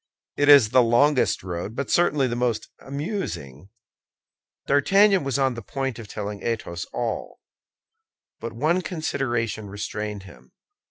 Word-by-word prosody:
It 145 0 +2
is 140 -7 +8
the 130 +2 +5
longest 125 +2 +3
road, 90 +4 -5
but 140 - -3
certainly 150 -5 +3
the 120 -2 -1
most 120 -2 -1
amusing." 135 - -5 1.0
D'Artagnan 195 +7 +4
was 135 -1 -1
on 135 -2 +2
the 115 - -7
point 135 +2 -4
of 110 - -9
telling 105 0 -6
Athos 90 -7 -3
all; 120 -3 -4 1.0
but 115 - -5
one 155 +10 +1
consideration 120 - -2
restrained 105 0 -5
him. 65 -9 -16
120 Hz, 130 wpm, -24 LUFS, 105-140 Hz, 1.0 s, is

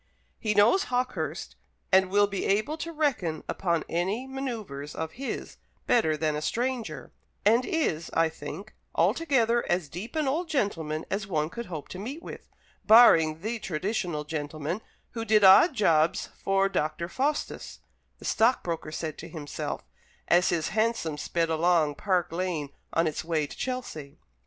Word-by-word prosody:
"He 210 -2 -1
knows 225 - +5
Hawkehurst, 250 +1 -2 0.4
and 190 0 +5
will 205 +2 +4
be 200 -1 -3
able 215 +10 +1
to 330 +1 -5
reckon 250 - -1
up - - -5 0.3
any 190 +9 -1
manoeuvres 230 - -5
of 160 0 -4
his 270 +7 -6 0.3
better 160 -10 +3
than 155 -1 0
a 150 - -3
stranger; 230 - -3 0.3
and 230 +4 +5
is, 235 - -1
I 165 0 +4
think, 160 +6 -8 0.2
altogether 240 -7 +2
as 175 -4 0
deep 190 - -7
an 310 -3 +1
old 325 +6 -1
gentleman 165 - -1
as 195 0 -2
one 155 -4 -1
could 235 +4 -6
hope 160 -5 -6
to 185 - -7
meet 270 - -6
with, - - -9 0.3
barring 165 -9 +6
the 225 +3 -3
traditional 180 -3 -2
gentleman 155 +4 -4 0.3
who 225 -2 -4
did 215 -2 +3
odd 195 - +8
jobs 165 -8 +2
for 195 0 +1
Dr. 170 -2 -2
Faustus," 280 +9 -2 0.4
the - - -12
stockbroker 175 -9 +1
said 155 0 -5
to 165 - -8
himself, 150 -3 -5 0.4
as 175 +1 +4
his 165 -3 0
hansom 215 -7 0
sped 165 +1 -1
along 160 -2 +3
Park 180 +1 0
Lane 165 -4 -2 0.2
on 165 - +2
its 155 - -2
way 160 -2 0
to - - -10
Chelsea. 245 - -5
185 Hz, 155 wpm, -27 LUFS, 160-235 Hz, 0.4 s, odd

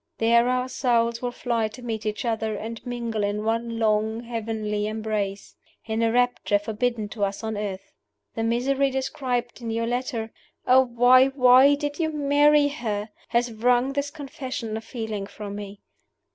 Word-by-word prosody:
There 235 +2 +4
our 255 0 0
souls 235 -3 +1
will 245 - -1
fly 235 -3 -1
to 230 +4 -12
meet 220 -2 -4
each 210 +3 -3
other, 220 -2 -1
and 225 +2 -6
mingle 235 -3 -2
in 205 +1 -1
one 230 +1 -1
long 220 0 +1
heavenly 220 -3 -3
embrace 215 -2 -3 0.3
in 220 0 -2
a 230 0 +2
rapture 245 -3 +2
forbidden 220 +1 -2
to 210 -1 -4
us 200 +2 -2
on 220 -1 -2
earth. 195 -2 -5 0.4
The - - -3
misery 260 +4 +1
described 255 -2 -3
in 230 - -4
your 230 +1 -1
letter 240 -2 -2 0.3
oh, 255 +1 +6
why, 250 +2 +5
why 265 +1 +6
did 290 +1 -4
you 320 -1 0
marry 290 0 +4
her? 220 -6 -3 0.2
has 240 0 +1
wrung 245 +4 +2
this 285 0 -1
confession 260 -6 -6
of 220 - -5
feeling 220 -4 -5
from 205 -1 -7
me. 205 0 -8
230 Hz, 165 wpm, -25 LUFS, 220-255 Hz, 0.4 s, oh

